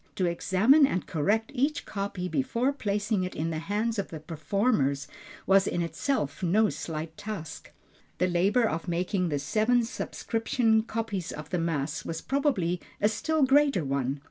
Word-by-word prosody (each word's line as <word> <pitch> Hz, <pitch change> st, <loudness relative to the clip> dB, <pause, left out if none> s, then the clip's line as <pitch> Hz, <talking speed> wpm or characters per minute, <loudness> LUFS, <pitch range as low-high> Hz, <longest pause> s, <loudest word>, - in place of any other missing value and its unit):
To 185 Hz, -, +1 dB
examine 200 Hz, -, +4 dB
and 185 Hz, -, -2 dB
correct 210 Hz, -, 0 dB
each 285 Hz, +3 st, 0 dB
copy 195 Hz, -3 st, -3 dB
before 260 Hz, +3 st, 0 dB
placing 205 Hz, -4 st, -1 dB
it 180 Hz, -, -4 dB
in 165 Hz, +2 st, -2 dB
the 155 Hz, -, -2 dB
hands 210 Hz, +5 st, -1 dB
of 200 Hz, -, -2 dB
the 160 Hz, -, -7 dB
performers 155 Hz, -, 0 dB, 0.4 s
was 195 Hz, +1 st, +4 dB
in 175 Hz, -, 0 dB
itself 165 Hz, -, -2 dB
no 205 Hz, +5 st, +3 dB
slight 160 Hz, 0 st, -5 dB
task. 205 Hz, -7 st, -7 dB, 0.5 s
The 180 Hz, -, +2 dB
labor 195 Hz, +7 st, +2 dB
of 165 Hz, 0 st, -3 dB
making 180 Hz, +1 st, 0 dB
the 145 Hz, -, 0 dB
seven 220 Hz, -, +2 dB
subscription 225 Hz, -1 st, 0 dB
copies 220 Hz, -5 st, -3 dB
of 150 Hz, 0 st, -8 dB
the 180 Hz, -, 0 dB
Mass, 160 Hz, -2 st, -2 dB
was 165 Hz, 0 st, -4 dB
probably 200 Hz, -, 0 dB, 0.2 s
a 210 Hz, -, +4 dB
still 300 Hz, +8 st, 0 dB
greater 275 Hz, -, +4 dB
one. 135 Hz, 0 st, -1 dB
195 Hz, 160 wpm, -28 LUFS, 165-225 Hz, 0.5 s, examine